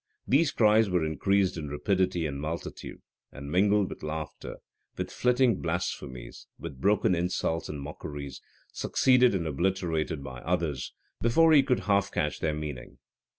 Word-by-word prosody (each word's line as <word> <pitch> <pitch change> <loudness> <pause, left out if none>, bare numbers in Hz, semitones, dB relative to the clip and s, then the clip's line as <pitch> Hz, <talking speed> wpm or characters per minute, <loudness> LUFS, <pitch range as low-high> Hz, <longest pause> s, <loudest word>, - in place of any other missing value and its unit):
These 145 +4 +3
cries 110 -1 +4
were 90 -3 +1
increased 95 +4 +1
in 75 -3 -5
rapidity 90 +3 0
and 70 -2 -4
multitude, 80 +3 -6 0.3
and 70 0 -8
mingled 100 +2 +3
with - - -9
laughter, 75 0 -6 0.4
with - - -4
flitting 125 -3 +2
blasphemies, 80 -8 -4
with 70 -6 -8
broken 100 -1 +3
insults 85 -2 -1
and 75 - -5
mockeries, 70 0 -7 0.3
succeeded 125 -4 +3
and 85 -3 -1
obliterated 80 -1 -1
by 65 -2 -8
others, 85 -6 -2 0.3
before 160 +8 +5
he 145 - +8
could 125 -6 0
half 100 0 +1
catch 75 - -1
their 75 -1 -1
meaning. 75 -5 -7
85 Hz, 145 wpm, -28 LUFS, 75-100 Hz, 0.4 s, he